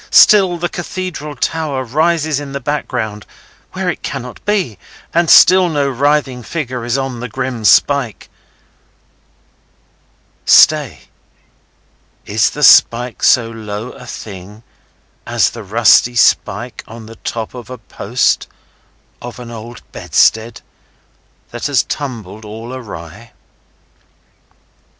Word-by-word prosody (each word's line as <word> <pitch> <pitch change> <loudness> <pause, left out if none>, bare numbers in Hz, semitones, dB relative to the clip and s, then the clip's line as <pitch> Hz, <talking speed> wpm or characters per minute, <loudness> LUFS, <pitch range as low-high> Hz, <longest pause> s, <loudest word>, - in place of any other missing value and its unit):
Still 190 -4 +6
the 175 +1 -2
Cathedral 175 -4 -6
Tower 145 -1 -2
rises 155 +3 0
in 140 -1 -8
the 140 - -3
background, 120 -7 -3 0.5
where - - -3
it - - -2
cannot 125 0 -7
be, 190 - -1 0.3
and 170 -1 +2
still 185 0 +7
no 145 -3 0
writhing 135 -1 0
figure 130 -3 -5
is 120 +2 -1
on 135 -3 -4
the 125 - -5
grim 125 -1 -4
spike. 135 +1 +2 2.2
Stay! - - +4 1.2
Is - - +1
the - - -5
spike 120 +1 +5
so 115 -2 +3
low 110 +1 -6
a 125 -2 -13
thing 105 0 -10 0.6
as - - +2
the 115 - -9
rusty 115 +3 +4
spike 115 - +1
on 115 0 -11
the 115 +1 -12
top 115 -2 -5
of 125 -1 -10
a 130 - -7
post 115 +2 -1 0.7
of 120 0 -8
an 120 -1 -9
old 115 +1 -10
bedstead 110 +1 +1 0.9
that 120 +3 -4
has 140 -4 +2
tumbled 110 -7 -6
all 110 +3 -8
awry? 105 -3 -10
125 Hz, 120 wpm, -16 LUFS, 115-145 Hz, 2.2 s, still